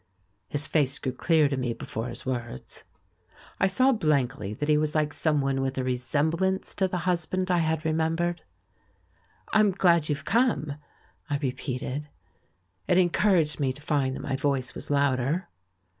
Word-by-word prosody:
His 145 +1 0
face 140 -3 +1
grew 130 - -3
clear 155 +3 +3
to 140 - -1
me 125 -3 -1
before 115 +1 -5
his 120 - -7
words. 120 - -5 0.7
I - - +4
saw 260 +7 +3
blankly 135 - 0
that 150 - -3
he 150 - +4
was 150 0 +1
like 150 -1 +1
someone 140 -4 +1
with 135 0 -2
a 130 - 0
re 125 0 0
semblance 160 +9 0
to 190 - +3
the 180 - -3
husband 185 +1 0
I 175 - +3
had 160 -1 0
remembered. 165 +2 0 1.1
"I'm 215 -1 +5
glad 170 -5 +3
you've 145 -1 -2
come," 200 - +1 0.6
I 145 - +1
repeated. 135 +1 -4 0.8
It 180 - +3
encour 185 +2 +3
aged 150 -1 -2
me 135 -2 +1
to 145 - -8
find 135 -3 0
that - - -6
my 135 - -1
voice 135 -2 -1
was - - -7
louder. 140 +3 +1
150 Hz, 165 wpm, -27 LUFS, 135-170 Hz, 1.1 s, I'm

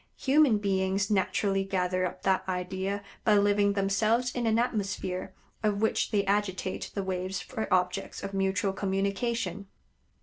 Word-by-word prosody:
Human 275 -4 +4
beings 195 0 0
naturally 195 0 +1
gather 185 -1 0
up - - -10
that 190 -1 +2
idea 190 +2 -2 0.2
by 210 -2 +5
living 205 0 +3
themselves 215 +5 +1
in 240 -2 -1
an 220 0 +3
atmosphere 195 -5 -2 0.3
of 210 -1 0
which 220 - +1
they 200 -2 +1
agitate 195 -2 -1
the 200 - -1
waves 185 0 -2
for 220 +4 -5
objects 185 +2 0
of 195 0 -5
mutual 195 +1 0
communication. 200 0 -1
195 Hz, 140 wpm, -29 LUFS, 190-210 Hz, 0.3 s, by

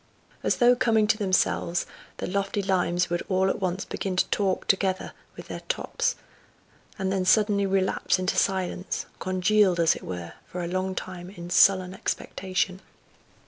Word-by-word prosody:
As - - +1
though 245 0 +5
coming 225 -4 +3
to 210 - +2
themselves 185 -3 +1 0.3
the - - -4
lofty 200 +1 -1
limes 180 -2 +1
would 175 - 0
all 190 0 +2
at - - -4
once 185 0 -1
begin 190 -2 -3
to 180 - +3
talk 195 -3 0
together 190 -1 0 0.2
with - - -9
their - - -6
tops, - - -1 0.8
and 190 -2 -1
then 190 -1 0
suddenly 200 0 +3
relapse 190 -1 +1
into 185 +1 -1
silence, 185 -1 -1
congealed, 185 0 +2
as 165 -1 +4
it - - -9
were, 90 -2 -6
for 180 0 -5
a - - -3
long 185 +1 -2
time 180 -1 -6
in 175 -3 -9
sullen 185 0 +5
expectation. 190 0 -2
185 Hz, 160 wpm, -26 LUFS, 180-195 Hz, 0.8 s, though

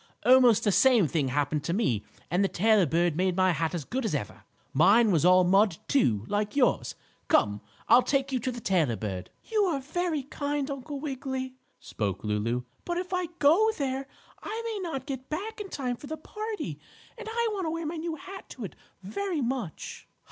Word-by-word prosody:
Almost 250 -3 +6
the 205 - +3
same 235 -4 +5
thing 150 -2 0
happened 145 +2 0
to 170 - 0
me 125 - +1 0.3
and 180 +3 +3
the - - +3
tailor 210 -1 +3
bird 170 +2 +1
made 185 +1 +1
my 185 0 +4
hat 165 0 -1
as 155 -5 -4
good 260 +2 -3
as 220 - 0
ever. - - -5 0.3
Mine 230 -2 +5
was 165 -4 +2
all 185 +1 +6
mud, 195 0 +4
too, 115 - +2
like 210 +2 -1
yours. 265 -4 +2 0.3
Come, 105 0 +2 0.3
I'll 245 - +7
take 275 +1 0
you 260 - 0
to 255 +2 -2
the 240 - -6
tailor 170 - +1
bird." 95 -4 -5
"You 430 -2 +1
are 325 -7 0
very 315 +1 -2
kind, 285 0 -3
Uncle 280 +1 -5
Wiggily," 265 -2 -4 0.3
spoke 100 -4 -3
Lulu, 110 +4 -1 0.2
"but 345 0 -2
if 365 +1 -4
I 365 -1 0
go 335 +10 +5
there 270 -1 -2 0.3
I 445 +2 -4
may 445 -3 -3
not 270 -4 -4
get 265 -2 -6
back 415 +8 -4
in 395 - -7
time 250 -6 -2
for 285 - -11
the 315 +2 -5
party, 340 - -5 0.4
and 460 -2 -8
I 470 0 0
want 385 -5 -2
to - - 0
wear 330 0 -3
my 325 +2 -3
new 325 0 -3
hat 380 +5 -10
to 235 - -5
it, 175 - -9 0.3
very 335 - -2
much." 240 - -4
255 Hz, 200 wpm, -28 LUFS, -, 0.4 s, I'll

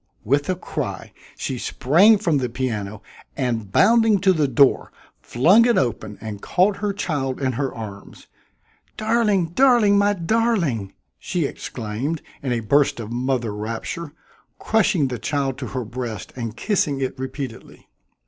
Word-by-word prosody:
With 140 - +1
a 185 - +1
cry 180 - -5 0.2
she 130 -2 -4
sprang 185 - +4
from 170 -8 +1
the 125 -2 -2
piano 110 -5 -4 0.3
and, 115 -7 -2
bounding 225 - +4
to 190 -1 +4
the 155 -4 +1
door, 135 +1 +3 0.3
flung 185 - +4
it 240 - +3
open 110 -4 -1
and 105 -2 -7
caught 195 +3 +2
her 205 -1 -1
child 145 -9 -2
in 130 -2 0
her 135 +2 -2
arms. 100 -3 -9 0.7
"Darling! 215 -5 +1
darling! 220 -1 +4
my 205 0 +3
darling!" 175 - 0 0.2
she - - -2
exclaimed 125 +9 -4 0.2
in 130 - -3
a 120 -1 0
burst 140 +4 +2
of 110 -1 -6
mother 120 -2 -1
rapture, 115 +10 -5 0.5
crushing 195 -9 +2
the 125 -3 -5
child 135 -3 -2
to - - -5
her 130 -3 -4
breast 120 -2 -6
and 115 -3 -5
kissing 150 - 0
it 130 -1 -2
repeatedly. 130 -2 -7
135 Hz, 150 wpm, -22 LUFS, 120-190 Hz, 0.7 s, sprang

